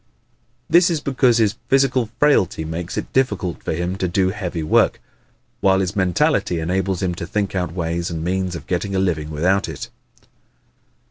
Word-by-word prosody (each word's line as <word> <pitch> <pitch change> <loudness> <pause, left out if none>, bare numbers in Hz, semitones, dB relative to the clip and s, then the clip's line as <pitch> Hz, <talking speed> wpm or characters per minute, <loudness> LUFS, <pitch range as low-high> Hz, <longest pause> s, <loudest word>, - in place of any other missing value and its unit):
This 175 +1 +5
is 165 -3 0
because 130 -4 +2
his 110 -1 +2
physical 130 -4 +2
frailty 100 - +2
makes 85 +2 -5
it - - -4
difficult 105 -9 0
for - - -3
him 90 +3 -2
to 95 - -1
do 95 +1 +1
heavy 90 -5 -4
work, 75 - +3 0.6
while 95 -1 +3
his 95 -1 -1
mentality 90 -2 +1
enables 95 +3 -1
him 90 -2 0
to 85 0 -6
think 100 +1 -2
out 90 -4 -1
ways 85 0 -2
and 80 -2 -4
means 90 0 -1
of - - -8
getting 95 +2 -2
a - - +2
living 80 -5 -1
without 90 +6 +1
it. - - -7
95 Hz, 175 wpm, -21 LUFS, 85-105 Hz, 0.6 s, This